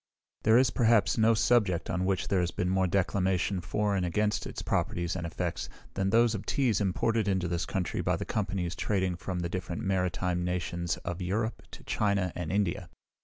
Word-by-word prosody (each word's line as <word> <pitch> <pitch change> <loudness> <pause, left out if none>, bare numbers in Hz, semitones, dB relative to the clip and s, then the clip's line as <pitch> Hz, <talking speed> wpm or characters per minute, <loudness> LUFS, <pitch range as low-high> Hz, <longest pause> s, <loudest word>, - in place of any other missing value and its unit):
There 110 +1 +5
is, 130 0 +4
perhaps, 115 -2 +3
no 110 +1 +5
subject 105 -7 +2
on 90 +1 -1
which 95 -1 0
there 100 - +2
has 90 -1 +1
been 90 +1 -1
more 95 0 +2
declamation, 95 0 +1
for 100 +4 0
and 95 - 0
against 105 +4 0
its - - -6
properties 85 0 -1
and 85 -2 -3
effects, 85 +1 -3 0.2
than 95 0 0
those 115 +2 +4
of 105 - -5
teas 120 -7 +1
imported 105 +3 +1
into 95 -3 +1
this 85 -1 -2
country 90 -3 -2
by - - +1
the - - -4
companies 95 -5 -2
trading 95 -3 0
from 90 0 -4
the 85 - -1
different 85 -1 -4
maritime 90 -2 0
nations 85 -1 -2
of 90 +1 -4
Europe 110 +5 -1
to - - -12
China 100 -4 0
and 85 -3 -4
India. 100 -3 -1
95 Hz, 190 wpm, -29 LUFS, 90-105 Hz, 0.2 s, There